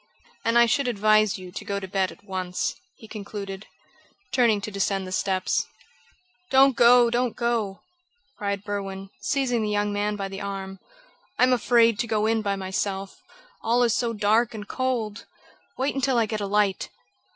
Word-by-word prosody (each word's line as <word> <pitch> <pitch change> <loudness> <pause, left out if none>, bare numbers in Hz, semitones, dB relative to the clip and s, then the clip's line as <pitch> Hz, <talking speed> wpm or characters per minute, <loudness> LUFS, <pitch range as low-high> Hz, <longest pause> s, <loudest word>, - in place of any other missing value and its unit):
"And 230 +1 +2
I 235 - +7
should 270 +3 +1
advise 215 -2 +3
you 185 -1 -10
to - - -7
go 200 0 -3
to 190 - -7
bed 190 0 0
at - - -16
once," 185 -2 -3 0.2
he 220 - -14
concluded, 200 -2 -7 0.6
turning 235 -5 +3
to 215 - -5
descend 195 -1 -1
the 185 - -8
steps. 185 0 0 0.8
"Don't 270 0 +5
go! 240 0 +6
Don't 245 0 0
go!" 230 -5 -1 0.5
cried 200 -1 -3
Berwin, 195 -1 -5
seizing 260 -5 0
the 215 - -1
young 205 0 0
man 205 +1 -1
by 200 -1 -3
the 195 +1 -7
arm. 195 -1 -5 0.6
"I - - +3
am 255 0 +5
afraid 230 -3 +3
to 235 - 0
go 215 -1 +1
in 225 0 +2
by 200 -2 -1
myself 195 0 -4 0.4
all 240 +2 +2
is 235 -2 +3
so 235 -1 0
dark 220 +2 +2
and 210 -1 -7
cold! 240 -5 -2 0.5
Wait 265 +2 0
until 270 -2 +1
I 230 - +3
get 215 0 -4
a 200 - -2
light!" 205 -1 +1
210 Hz, 175 wpm, -25 LUFS, 195-235 Hz, 0.8 s, I